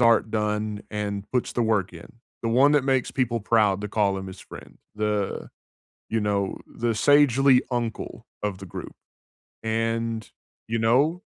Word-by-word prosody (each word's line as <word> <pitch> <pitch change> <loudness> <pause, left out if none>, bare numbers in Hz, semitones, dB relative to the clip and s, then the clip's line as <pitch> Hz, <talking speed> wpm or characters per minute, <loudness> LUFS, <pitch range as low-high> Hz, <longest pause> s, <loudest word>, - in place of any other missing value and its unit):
art 115 -2 +4
done, 105 -1 -1
and 100 -1 -3
puts 125 - 0
the 120 - 0
work 105 -5 +1
in. 85 -1 -10 0.4
The 115 - 0
one 130 +5 +5
that 145 -3 +3
makes 130 -2 +1
people 120 -3 0
proud 105 -2 +3
to 105 - -4
call 100 -2 +1
him 95 0 -5
his 95 - -10
friend. - - -12 0.2
The 105 -2 -2 0.6
you 115 - +1
know, 100 -2 0
the 115 -1 -2
sagely 135 0 +5
uncle 120 -2 -3 0.2
of 100 -3 -2
the 95 - -8
group, - - -8 0.7
and, 115 0 -1 0.4
you 115 +1 0
know 135 +10 +3
110 Hz, 160 wpm, -25 LUFS, 105-120 Hz, 0.7 s, one